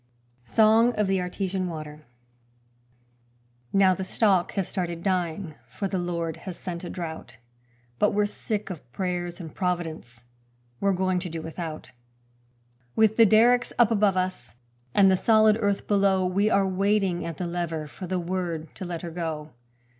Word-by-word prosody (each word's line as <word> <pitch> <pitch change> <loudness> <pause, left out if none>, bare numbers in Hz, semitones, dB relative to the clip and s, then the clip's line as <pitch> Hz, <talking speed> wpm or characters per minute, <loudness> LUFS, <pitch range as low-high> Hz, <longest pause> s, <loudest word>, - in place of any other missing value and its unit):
Song 225 - +5
of 210 - +1
the 190 -1 +1
Artesian 185 +1 -2
Water 155 -3 -8 1.6
Now 195 -1 +5
the 190 - -4
stock 190 -2 +2
have 195 -3 -1
started 170 -3 -4
dying, 180 -3 -1
for 200 - -4
the 190 -1 -2
Lord 170 -2 -3
has 185 -3 -8
sent 170 -1 -6
a 175 - -5
drought; 160 -8 -7 0.6
But - - +4
we're 210 0 +1
sick 205 0 -4
of 145 -9 -10
prayers 175 0 -3
and 160 -4 -8
Providence 165 - -3 0.6
we're 200 - +2
going 185 -1 +1
to 180 0 -5
do 165 -1 -5
without; 160 -1 -6 1.0
With 220 -1 +4
the 230 -1 +7
derricks 240 +4 +4
up 235 -2 +5
above 205 -3 +3
us 185 -6 -3 0.4
and 195 -1 +6
the - - +5
solid 215 +2 +5
earth 200 -2 0
below, 195 -2 +3
We 195 +4 +2
are 200 -3 +3
waiting 195 -1 +1
at 165 - -5
the 180 - -3
lever 170 -2 -3
for 180 +5 -8
the 185 +1 -1
word 170 -2 -3
to 185 - -5
let 175 -2 -5
her 170 - -5
go. 160 -2 -4
185 Hz, 160 wpm, -26 LUFS, 170-200 Hz, 1.6 s, the